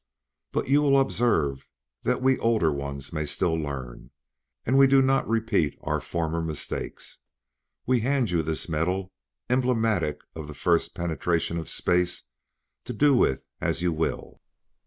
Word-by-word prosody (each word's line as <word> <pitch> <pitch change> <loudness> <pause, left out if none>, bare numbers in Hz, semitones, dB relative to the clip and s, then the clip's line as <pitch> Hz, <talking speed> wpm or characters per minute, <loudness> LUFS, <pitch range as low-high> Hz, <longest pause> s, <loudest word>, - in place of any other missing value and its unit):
"But - - -1
you 140 +2 +4
will 140 -2 +4
observe 95 - +1 0.3
that 125 0 0
we 130 0 +3
older 110 -9 +2
ones 70 0 -5
may 75 -2 -2
still 80 +3 0
learn, 70 -6 -5 0.6
and 130 - +1
we 135 0 +7
do 135 0 +5
not 135 -1 +2
repeat 110 -9 +1
our - - -1
former 85 -1 -2
mistake. 80 -2 -4 0.9
We 130 -1 +3
hand 125 -3 +1
you 85 -2 +2
this 80 0 -3
medal, 90 +4 -1 0.4
emblematic 115 - +1
of 80 -2 -6
the 75 - -9
first 85 +3 +1
penetration 85 0 -1
of 80 - -6
space, 90 0 0 0.6
to 125 - -5
do 145 +5 +4
with 125 - +2 0.2
as 85 - -1
you 85 -2 +2
will." 80 +1 -3
90 Hz, 150 wpm, -26 LUFS, 80-125 Hz, 0.9 s, we